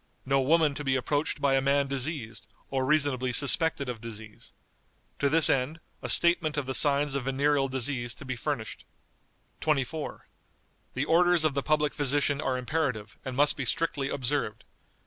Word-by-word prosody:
No 135 Hz, +1 st, +2 dB
woman 155 Hz, +2 st, +2 dB
to 145 Hz, -, -6 dB
be 135 Hz, -2 st, 0 dB
approached 145 Hz, +4 st, -1 dB
by 140 Hz, -1 st, +1 dB
a 135 Hz, -, +2 dB
man 140 Hz, +1 st, +2 dB
diseased, 135 Hz, -4 st, -4 dB, 0.2 s
or 135 Hz, -1 st, 0 dB
reasonably 135 Hz, -3 st, +1 dB
suspected 140 Hz, +2 st, +2 dB
of 120 Hz, -3 st, -6 dB
disease. 110 Hz, -2 st, -9 dB, 0.7 s
To 140 Hz, -, +2 dB
this 160 Hz, +2 st, +5 dB
end, 135 Hz, +5 st, 0 dB, 0.2 s
a -, -, -5 dB
statement 170 Hz, -3 st, +4 dB
of 145 Hz, -, -1 dB
the 130 Hz, -, -3 dB
signs 145 Hz, 0 st, +4 dB
of 140 Hz, -2 st, -3 dB
venereal 135 Hz, +1 st, +1 dB
disease 130 Hz, -2 st, -3 dB
to 140 Hz, -, -12 dB
be 130 Hz, -1 st, -4 dB
furnished." 120 Hz, -3 st, -5 dB, 0.8 s
"24. 150 Hz, 0 st, -2 dB, 0.7 s
The 130 Hz, +3 st, -1 dB
orders 175 Hz, 0 st, +3 dB
of 155 Hz, -, +2 dB
the 140 Hz, -, -1 dB
public 150 Hz, 0 st, 0 dB
physician 145 Hz, 0 st, +1 dB
are 130 Hz, -3 st, -1 dB
imperative, 125 Hz, -6 st, -3 dB
and 130 Hz, -1 st, -6 dB
must 145 Hz, +1 st, +4 dB
be 140 Hz, -, -4 dB
strictly 140 Hz, 0 st, -1 dB
observed. 140 Hz, +2 st, -2 dB
140 Hz, 165 wpm, -27 LUFS, 130-150 Hz, 0.8 s, this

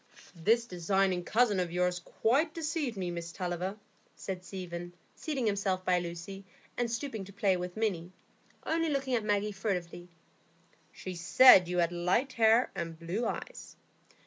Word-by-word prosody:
"This 225 Hz, +7 st, +2 dB
designing 185 Hz, -1 st, 0 dB
cousin 215 Hz, -1 st, +2 dB
of 175 Hz, -2 st, -1 dB
yours 180 Hz, 0 st, 0 dB
quite 275 Hz, -, 0 dB
deceived 300 Hz, -7 st, -2 dB
me, 180 Hz, -2 st, -2 dB
Miss 170 Hz, 0 st, -6 dB
Tulliver," 180 Hz, +2 st, -3 dB, 0.4 s
said 185 Hz, -2 st, -6 dB
Stephen, 175 Hz, -1 st, -7 dB, 0.2 s
seating 275 Hz, -6 st, -3 dB
himself 195 Hz, -3 st, 0 dB
by 180 Hz, -1 st, +3 dB
Lucy, 175 Hz, +3 st, -7 dB, 0.3 s
and 240 Hz, -1 st, -1 dB
stooping 230 Hz, -3 st, -4 dB
to 200 Hz, -, -12 dB
play 200 Hz, -1 st, +1 dB
with 180 Hz, +2 st, -5 dB
Minny, 185 Hz, -6 st, -1 dB, 0.5 s
only 330 Hz, 0 st, 0 dB
looking 270 Hz, -3 st, -1 dB
at 230 Hz, -3 st, +1 dB
Maggie 210 Hz, 0 st, 0 dB
furtively. 180 Hz, -3 st, -4 dB, 0.8 s
"She 185 Hz, -, -7 dB
said 185 Hz, +3 st, +7 dB
you 180 Hz, 0 st, -2 dB
had 170 Hz, -1 st, +2 dB
light 180 Hz, +10 st, 0 dB
hair 225 Hz, +1 st, +4 dB
and 165 Hz, -4 st, -5 dB
blue 175 Hz, +8 st, -2 dB
eyes." -, -, -6 dB
190 Hz, 150 wpm, -30 LUFS, 175-230 Hz, 0.8 s, said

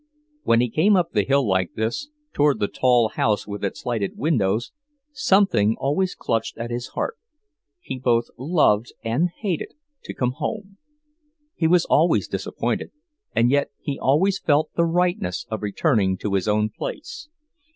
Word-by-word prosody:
When 115 Hz, -, +3 dB
he 125 Hz, -, 0 dB
came 195 Hz, -, +4 dB
up 175 Hz, -3 st, +1 dB
the 105 Hz, -, +2 dB
hill 135 Hz, +4 st, +2 dB
like 95 Hz, -2 st, 0 dB
this, 115 Hz, -, -2 dB, 0.2 s
toward 145 Hz, -1 st, +2 dB
the 100 Hz, -, +1 dB
tall 120 Hz, -2 st, +3 dB
house 105 Hz, -1 st, 0 dB
with 105 Hz, 0 st, -7 dB
its 100 Hz, +6 st, -4 dB
lighted 115 Hz, -5 st, -2 dB
windows, 115 Hz, -7 st, 0 dB, 0.4 s
something 190 Hz, -, +3 dB
always 150 Hz, +8 st, 0 dB
clutched 115 Hz, -, -2 dB
at 115 Hz, +1 st, -5 dB
his 120 Hz, +1 st, -3 dB
heart. 460 Hz, -, -2 dB, 0.6 s
He 130 Hz, -, -6 dB
both 120 Hz, -2 st, +2 dB
loved 130 Hz, -6 st, +2 dB
and 125 Hz, +10 st, +1 dB
hated 180 Hz, -1 st, -4 dB, 0.3 s
to -, -, -7 dB
come 125 Hz, -1 st, 0 dB
home. 195 Hz, +5 st, -5 dB, 0.8 s
He 160 Hz, -, +1 dB
was 175 Hz, +1 st, +4 dB
always 165 Hz, +4 st, +3 dB
disappointed, -, -, -3 dB, 0.5 s
and 120 Hz, +2 st, +3 dB
yet 140 Hz, 0 st, +2 dB
he 140 Hz, -, -4 dB
always 185 Hz, +9 st, +2 dB
felt 150 Hz, 0 st, +1 dB
the 170 Hz, -, +2 dB
rightness 170 Hz, -, 0 dB
of 110 Hz, -, -3 dB
returning 105 Hz, -, +1 dB
to 100 Hz, +1 st, -3 dB
his 95 Hz, +1 st, 0 dB
own 105 Hz, 0 st, +2 dB
place. 380 Hz, -, -7 dB
125 Hz, 160 wpm, -23 LUFS, 110-170 Hz, 0.8 s, came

